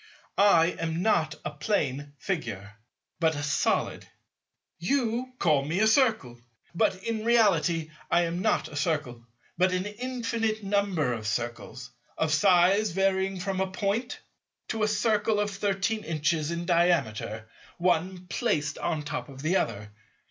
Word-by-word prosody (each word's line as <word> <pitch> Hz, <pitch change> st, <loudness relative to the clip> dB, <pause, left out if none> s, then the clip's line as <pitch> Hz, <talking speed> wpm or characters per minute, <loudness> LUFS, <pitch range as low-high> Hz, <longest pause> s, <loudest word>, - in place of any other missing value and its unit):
I 180 Hz, -4 st, +5 dB
am 165 Hz, +1 st, -2 dB
not 160 Hz, -8 st, +2 dB
a 150 Hz, -, -2 dB
plane 145 Hz, -4 st, -2 dB
Figure, 115 Hz, -, -4 dB, 0.5 s
but 160 Hz, -2 st, +2 dB
a 145 Hz, -, -4 dB
Solid. 145 Hz, 0 st, 0 dB, 0.7 s
You 245 Hz, +5 st, -1 dB
call 150 Hz, -, +2 dB
me 160 Hz, +6 st, -1 dB
a 215 Hz, -, +4 dB
Circle; 220 Hz, -, +2 dB, 0.3 s
but 185 Hz, +2 st, +1 dB
in 225 Hz, -1 st, -2 dB
reality 175 Hz, -9 st, +2 dB, 0.2 s
I 175 Hz, -, +3 dB
am 170 Hz, +1 st, -2 dB
not -, -, +1 dB
a 150 Hz, -, -11 dB
Circle, 145 Hz, -6 st, -2 dB, 0.4 s
but 185 Hz, +1 st, +4 dB
an 185 Hz, +1 st, -1 dB
infinite 230 Hz, -1 st, -2 dB
number 195 Hz, -9 st, 0 dB
of 110 Hz, -2 st, -5 dB
Circles, 120 Hz, +2 st, -4 dB, 0.3 s
of 160 Hz, -1 st, +1 dB
size 190 Hz, +4 st, +4 dB
varying 190 Hz, +1 st, 0 dB
from 190 Hz, +1 st, -2 dB
a 190 Hz, -, 0 dB
Point 205 Hz, +6 st, -2 dB, 0.5 s
to 220 Hz, -, -2 dB
a 215 Hz, -, +3 dB
Circle 210 Hz, 0 st, +1 dB
of 205 Hz, 0 st, 0 dB
thirteen 200 Hz, +2 st, -1 dB
inches 160 Hz, -1 st, 0 dB
in 170 Hz, 0 st, -3 dB
diameter, 165 Hz, -, +1 dB, 0.3 s
one 180 Hz, +1 st, 0 dB
placed 150 Hz, -8 st, -1 dB
on 160 Hz, -3 st, -1 dB
the -, -, -11 dB
top 150 Hz, -, -4 dB
of 135 Hz, 0 st, -10 dB
the 165 Hz, +4 st, +1 dB
other. 105 Hz, -, -1 dB
180 Hz, 150 wpm, -27 LUFS, 150-205 Hz, 0.7 s, I